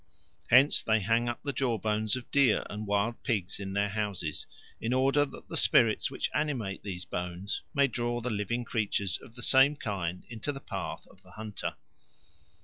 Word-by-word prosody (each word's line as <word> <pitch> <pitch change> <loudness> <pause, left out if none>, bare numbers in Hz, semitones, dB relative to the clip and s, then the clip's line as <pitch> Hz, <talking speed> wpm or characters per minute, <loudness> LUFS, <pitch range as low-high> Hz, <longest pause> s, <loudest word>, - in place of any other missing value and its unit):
Hence 130 +5 +6
they 110 0 +2
hang 115 +4 +2
up 120 - -5
the 140 -1 -2
jawbones 110 -4 0
of 125 -2 -8
deer 140 -6 +4
and 105 0 -5
wild 105 +3 0
pigs 100 -6 -1
in 95 -1 -5
their 100 +1 +1
houses, 100 -7 -2 0.3
in 115 +2 -1
order 135 +3 +3
that - - -12
the - - -5
spirits - - +4
which - - -2
animate 130 -10 -1
these 90 -3 -5
bones 90 +3 -3
may 140 0 +5
draw 120 -2 -1
the 120 +1 -3
living 110 +4 -1
creatures 100 -4 0
of 115 - -15
the 120 - -8
same 135 +2 +5
kind 90 -8 -3
into 115 +4 -4
the 135 - -7
path - - -5
of - - -21
the - - -17
hunter. 105 -1 -4
110 Hz, 180 wpm, -30 LUFS, 100-125 Hz, 0.3 s, Hence